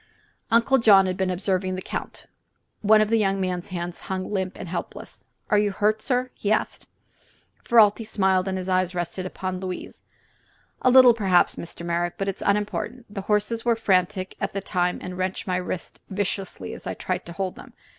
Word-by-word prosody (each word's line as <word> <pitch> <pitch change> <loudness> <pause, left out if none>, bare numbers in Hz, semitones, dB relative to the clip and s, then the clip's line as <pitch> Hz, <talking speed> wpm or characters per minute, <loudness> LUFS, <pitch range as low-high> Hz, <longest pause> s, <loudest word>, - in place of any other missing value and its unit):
Uncle 235 +4 +4
John 200 -4 +7
had 185 -1 -1
been 190 -1 -1
observing 185 0 -1
the 185 - -5
Count. - - -6 0.6
One 215 +1 +5
of 215 - +1
the 225 - +4
young 195 -2 +1
man's 180 -2 -2
hands 175 -2 -5
hung 185 0 -3
limp 190 -2 -2
and - - -7
helpless. 170 - -7 0.3
"Are 210 - +5
you 205 -1 +1
hurt, 215 +2 +1
sir?" 250 +1 -1
he 205 - -2
asked. 215 - -1 0.8
Ferralti 225 -1 +5
smiled, 190 -3 +1
and 190 0 -1
his 185 0 -5
eyes 185 -1 +1
rested 180 +1 -3
upon 185 0 -4
Louise. 185 -1 -6 0.8
"A - - +4
little, 255 -1 +8
perhaps, 190 -5 +3
Mr. 170 0 -8
Merrick; 170 0 -1
but 195 - -2
it 195 - -2
is - - -6
unimportant. 210 +3 -2
The 200 - -4
horses 210 +3 0
were 235 -1 +3
frantic 185 -3 0
at - - -2
the 195 - -1
time 180 -2 0
and 180 0 -6
wrenched 185 0 -2
my 185 -2 0
wrist 180 0 -5
viciously 190 - -3
as - - -9
I - - -3
tried - - -3
to 170 - -7
hold 185 +1 -3
them. - - -13
190 Hz, 195 wpm, -24 LUFS, 185-210 Hz, 0.8 s, little